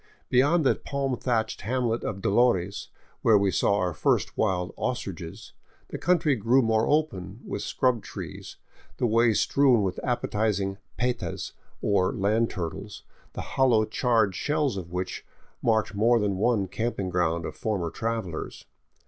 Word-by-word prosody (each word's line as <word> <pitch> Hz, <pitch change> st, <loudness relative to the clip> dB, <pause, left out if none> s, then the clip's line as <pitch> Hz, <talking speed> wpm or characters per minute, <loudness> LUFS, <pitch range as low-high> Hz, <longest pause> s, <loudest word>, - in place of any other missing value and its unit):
Beyond 145 Hz, +6 st, +3 dB
the -, -, +5 dB
palm 140 Hz, -2 st, -2 dB
thatched 115 Hz, -3 st, -1 dB
hamlet 120 Hz, +1 st, -1 dB
of 100 Hz, -2 st, -4 dB
Dolores, 100 Hz, -3 st, +2 dB, 0.3 s
where 110 Hz, -2 st, +5 dB
we 100 Hz, -1 st, +2 dB
saw 100 Hz, -, +2 dB
our 90 Hz, -3 st, 0 dB
first -, -, +1 dB
wild 90 Hz, -1 st, 0 dB
ostriches, 95 Hz, -10 st, -5 dB, 0.4 s
the -, -, -5 dB
country 165 Hz, -5 st, +2 dB
grew 120 Hz, +4 st, +3 dB
more 110 Hz, 0 st, +2 dB
open, 110 Hz, -, 0 dB
with -, -, -4 dB
scrub 125 Hz, -4 st, +1 dB
trees, -, -, -8 dB, 0.4 s
the -, -, 0 dB
way 115 Hz, +1 st, +4 dB
strewn 130 Hz, -4 st, +3 dB
with 95 Hz, -2 st, -2 dB
appetizing 105 Hz, -5 st, -1 dB, 0.2 s
petas, 125 Hz, 0 st, -2 dB, 0.3 s
or 95 Hz, -2 st, +2 dB
land 110 Hz, +4 st, +1 dB
turtles, 85 Hz, -3 st, -6 dB, 0.3 s
the -, -, -4 dB
hollow 120 Hz, -5 st, +2 dB
charred 110 Hz, -3 st, +1 dB
shells 145 Hz, -, 0 dB
of 90 Hz, -3 st, -6 dB
which 90 Hz, +1 st, -4 dB, 0.4 s
marked 110 Hz, -3 st, +1 dB
more 115 Hz, +4 st, +3 dB
than 100 Hz, -2 st, 0 dB
one 105 Hz, -2 st, +1 dB
camping 100 Hz, -2 st, -3 dB
ground 85 Hz, -1 st, 0 dB
of -, -, -6 dB
former 95 Hz, -7 st, -2 dB
travelers. 110 Hz, -8 st, -4 dB
110 Hz, 145 wpm, -26 LUFS, 95-125 Hz, 0.4 s, the